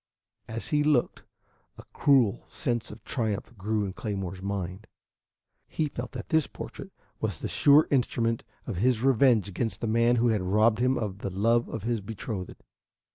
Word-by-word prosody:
As 115 +1 -5
he 150 -2 +2
looked, 145 -5 +1 0.6
a - - -10
cruel 130 -8 +3
sense 120 -2 -2
of 110 - -11
triumph 110 -2 -3
grew 105 +1 -1
in 95 - -5
Claymore's 95 -3 -4
mind. 95 +1 -4 0.8
He 155 -2 -1
felt 120 -2 -6
that - - -7
this 160 -3 +3
portrait - - -8 0.3
was - - -2
the - - -4
sure 145 +2 +5
instrument 115 -3 +1 0.2
of 105 - -4
his 120 +3 +2
revenge 125 -5 +4
against 105 +4 -3
the - - -3
man 115 +2 +3
who 120 0 +3
had 110 -3 +1
robbed 105 +4 +3
him 130 +2 +2
of 100 -4 -3
the 100 - -3
love 115 +5 +1
of 110 - -5
his 115 -1 -1
betrothed. 100 -2 -6
115 Hz, 170 wpm, -28 LUFS, 100-120 Hz, 0.8 s, sure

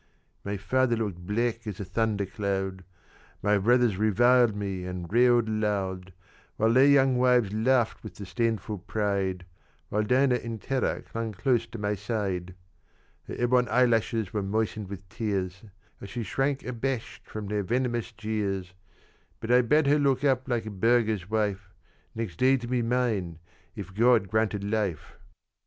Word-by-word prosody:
"My 100 0 -3
father 120 +5 +1
looked 95 -6 -4
black 115 +1 -1
as 100 -3 -5
a 100 - -4
thunder 105 +1 0
cloud, 95 -1 -3 0.6
My 105 0 +3
brothers 120 -1 +3
reviled 120 +2 +4
me 100 -3 -4
and 90 -1 -5
railed 120 -1 +4
aloud, 100 -4 -2 0.5
And 110 +2 +2
their 135 +2 +7
young 135 -3 +4
wives 125 -5 +3
laughed 115 +1 +1
with 110 - -9
disdainful 105 +1 -2
pride, 95 -3 -2 0.4
While 105 - 0
Dinah 125 +3 +3
in 115 -2 -6
terror 130 +4 -1
clung 115 -1 -5
close 120 +2 +1
to 115 - -8
my 105 -1 -1
side. 95 -4 -3 0.7
"Her - - -6
ebon 125 0 +2
eyelashes 115 -4 +2
were 105 - 0
moistened 105 0 -2
with 100 -1 -8
tears, 95 -2 -3 0.4
As 100 - -8
she 120 +3 -4
shrank 135 +4 -1
abashed 125 0 -4
from 110 -1 -6
their 105 +1 -1
venomous 120 +2 -1
jeers: 100 -4 -3 0.7
But 115 +1 -3
I 125 +1 +6
bade 150 +5 +3
her 145 +2 +4
look 135 -2 +1
up 130 -2 +2
like 120 -3 0
a 110 - -5
burgher's 110 -2 +1
wife 105 -3 -1 0.5
Next 110 -7 -4
day 130 +4 +4
to 120 - -7
be 125 0 0
mine, 115 -8 -1 0.4
if 95 -3 -8
God 115 -2 +3
granted 110 -2 0
life. 100 -6 -3
110 Hz, 155 wpm, -27 LUFS, 100-120 Hz, 0.7 s, their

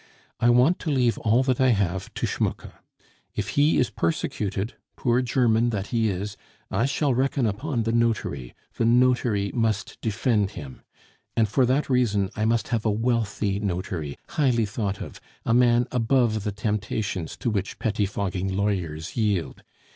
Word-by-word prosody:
I 120 - +4
want 125 +9 +4
to 160 - -3
leave 125 -5 +2
all 115 +4 +3
that 130 -1 +1
I 130 - +5
have 95 -5 0
to - - -1
Schmucke. - - -2 0.6
If - - -2
he 145 +3 +3
is 125 - +2
persecuted, 100 +4 -2 0.2
poor 120 0 +1
German 120 -2 +2
that 100 -3 -2
he 115 -2 +2
is, 100 +2 -4 0.3
I 120 - +1
shall 140 -1 +1
reckon 130 +1 +1
upon 115 +4 -1
the 115 - 0
notary; 110 - -1 0.2
the 115 - +1
notary 120 -4 +3
must 110 -4 -1
defend 105 -1 +1
him. 70 -4 -8 0.6
And 110 -1 +4
for 125 +5 +2
that 135 +4 +1
reason 105 -7 +1
I 110 - 0
must 115 0 +1
have 115 -3 0
a 110 - +1
wealthy 105 -3 0
notary, 90 -6 -3
highly 125 -8 +2
thought 100 -1 -3
of, - - -8 0.2
a 115 - +2
man 120 0 +4
above 115 -3 +1
the 105 - 0
temptations 105 -3 -3
to 120 - -1
which 100 -1 -2
pettifogging 100 -3 -1
lawyers 95 -5 -2
yield. 105 -7 -1
110 Hz, 160 wpm, -25 LUFS, 100-120 Hz, 0.6 s, I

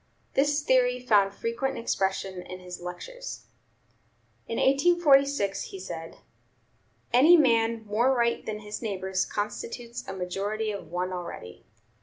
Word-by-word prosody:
This 290 +1 +2
theory 250 -3 +3
found 210 -5 +3
frequent 230 +6 -2
expression 190 -4 -1
in 185 +1 -9
his 180 -1 -9
lectures. - - -7 1.0
In 230 - -3
1846 280 - +3
he 195 - -8
said: 165 -3 -7 1.0
"Any 305 +8 +8
man 230 -5 +2
more 225 +5 +2
right 235 -2 +1
than 215 -1 -5
his 210 0 -6
neighbors 190 -3 -1
constitutes 235 +3 -5
a 195 - -4
majority 200 +4 -2
of 200 -5 -7
one 180 +2 -2
already." 170 - -8
220 Hz, 125 wpm, -27 LUFS, 190-255 Hz, 1.0 s, Any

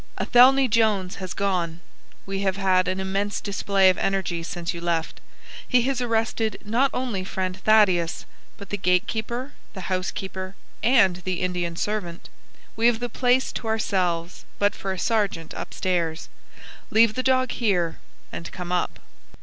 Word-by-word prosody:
Atheney 260 +2 +6
Jones 210 -5 +1
has 185 -2 -6
gone. 175 -4 -1 0.5
We 195 0 -3
have 195 -1 0
had 185 -2 +2
an 185 +1 -1
immense 195 +2 -1
display 200 -1 +2
of 185 - +3
energy 190 -3 -1
since 170 0 -4
you 170 - -7
left. 170 -2 -2 0.5
He 250 -1 +3
has 260 0 0
arrested 225 -2 0
not 240 +6 +2
only 240 -7 -2
friend 185 -1 -3
Thaddeus, 190 -6 +3 0.3
but 200 - -11
the 205 - -1
gatekeeper, 220 +9 -1 0.2
the 190 0 -6
housekeeper, 185 +1 -4 0.3
and 225 -8 +4
the 180 0 -3
Indian 175 -2 -2
servant. 175 -3 -3 0.5
We 230 +1 +3
have 235 -2 +2
the 245 0 -3
place 250 +2 +2
to 230 - -5
ourselves, 185 -6 -1
but 205 +1 +2
for 195 - -4
a 190 - -3
sergeant 200 -6 -1
upstairs. 170 -3 -2 0.6
Leave 225 0 +5
the 255 - -1
dog 255 -1 +2
here, 180 -8 0 0.3
and 170 - -7
come 180 -1 -6
up." 180 - -1
195 Hz, 150 wpm, -24 LUFS, 180-225 Hz, 0.6 s, Atheney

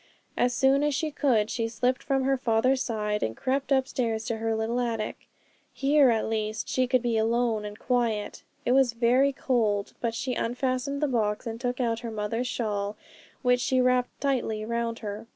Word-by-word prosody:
As 245 - +2
soon 270 +3 +3
as 295 -1 +1
she 310 +2 -1
could, 235 -7 +1
she 230 -1 -1
slipped 245 +3 0
from 270 -1 0
her 270 +1 +2
father's 255 +1 +2
side, 210 -3 -1
and 110 +1 -2
crept 270 +2 -1
upstairs 250 -4 0
to 230 - -2
her 225 0 -1
little 225 +2 -1
attic. 225 -3 -3 0.4
Here 280 0 +4
at 225 -2 +1
least 215 -1 -2
she 255 -1 +1
could 255 -1 +2
be 230 -2 +1
alone 225 -1 +1
and 210 0 -7
quiet. 235 -4 -1 0.2
It - - +2
was 260 -2 +4
very 250 +4 +3
cold, 220 -7 0
but 230 -1 -1
she 250 +2 -2
unfastened 255 +4 -1
the - - +3
box 215 -5 0
and 230 0 -5
took 250 0 -2
out 230 -2 0
her 235 - -5
mother's 225 +3 -2
shawl, 210 -4 -2 0.5
which 250 -1 +3
she 260 +1 +1
wrapped 250 0 +1
tightly 240 -6 -1
round 235 0 -2
her. 210 +2 -5
240 Hz, 190 wpm, -27 LUFS, 220-255 Hz, 0.5 s, Here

